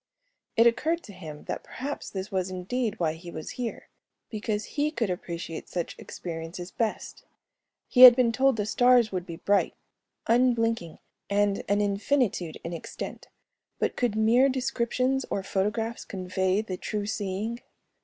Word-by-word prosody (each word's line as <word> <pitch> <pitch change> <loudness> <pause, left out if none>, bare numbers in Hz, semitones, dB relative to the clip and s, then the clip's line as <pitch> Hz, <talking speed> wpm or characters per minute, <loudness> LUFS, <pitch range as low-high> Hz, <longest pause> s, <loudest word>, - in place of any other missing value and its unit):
It 230 - +6
occurred 320 +8 +2
to 205 - -11
him 155 -5 -9
that - - -5
perhaps 280 +4 -5
this 195 +2 -5
was 190 -1 -1
indeed 215 +5 -2
why 160 -3 +1
he 170 +2 -10
was 155 - -6
here, 245 -2 -5 0.4
because 215 -1 -2
he 295 +1 0
could 235 - -1
appreciate 170 -2 -5
such 175 -2 -3
experiences 170 +1 -7
best. 225 -2 -3 0.6
He 250 - +3
had 250 -2 +13
been 245 -2 +3
told 265 +2 +3
the 210 - 0
stars 245 +1 +4
would 185 -2 -3
be 170 - -6
bright, 200 +4 +1 0.5
unblinking, 230 -7 +2 0.3
and 200 0 +2
an 205 +1 +3
infinitude 200 - 0
in 170 - -5
extent, 165 - -7 0.5
but - - -1
could 240 -4 0
mere 235 +5 +4
descriptions 255 0 0
or 195 - -2
photographs 210 +4 -1
convey 185 +1 -1
the 190 -4 -5
true 210 +2 -3
seeing? 210 +2 -3
210 Hz, 150 wpm, -27 LUFS, 185-240 Hz, 0.6 s, had